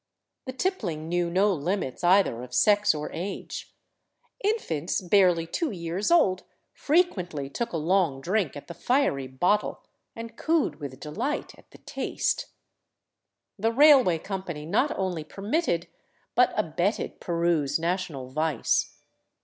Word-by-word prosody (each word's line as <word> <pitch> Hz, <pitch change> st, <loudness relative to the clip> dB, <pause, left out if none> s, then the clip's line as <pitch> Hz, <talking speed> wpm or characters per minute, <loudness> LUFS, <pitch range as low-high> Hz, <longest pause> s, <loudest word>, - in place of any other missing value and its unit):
The 260 Hz, -, -4 dB
tippling 205 Hz, -, -2 dB
knew 175 Hz, 0 st, 0 dB
no 195 Hz, +4 st, +3 dB
limits 175 Hz, -2 st, -3 dB
either 175 Hz, -9 st, +4 dB
of 125 Hz, 0 st, -8 dB
sex 205 Hz, -3 st, +4 dB
or 150 Hz, 0 st, -5 dB
age. 185 Hz, +4 st, -6 dB, 0.7 s
Infants 185 Hz, -, -1 dB
barely 180 Hz, -3 st, +3 dB
two 305 Hz, -, -2 dB
years 175 Hz, -1 st, -3 dB
old 195 Hz, -, +4 dB, 0.3 s
frequently 180 Hz, -, 0 dB
took 235 Hz, -, -3 dB
a 170 Hz, -, -2 dB
long 165 Hz, -3 st, +1 dB
drink 180 Hz, -1 st, -1 dB
at 145 Hz, -, -10 dB
the 170 Hz, -, -7 dB
fiery 205 Hz, -, +1 dB
bottle, 180 Hz, +11 st, 0 dB, 0.3 s
and 230 Hz, 0 st, -8 dB
cooed 310 Hz, -, 0 dB
with 140 Hz, -3 st, -7 dB
delight 155 Hz, -, -3 dB
at -, -, -21 dB
the -, -, -16 dB
taste. -, -, -2 dB, 1.1 s
The 225 Hz, +3 st, +1 dB
railway 265 Hz, -, +6 dB
company 175 Hz, -4 st, -6 dB
not 215 Hz, -, +2 dB
only 180 Hz, -4 st, -2 dB
permitted, 195 Hz, -, -1 dB, 0.5 s
but -, -, +4 dB
abetted -, -, -1 dB
Peru's 170 Hz, -4 st, 0 dB
national 165 Hz, -6 st, -3 dB
vice. 155 Hz, -2 st, 0 dB
180 Hz, 130 wpm, -26 LUFS, 155-210 Hz, 1.1 s, railway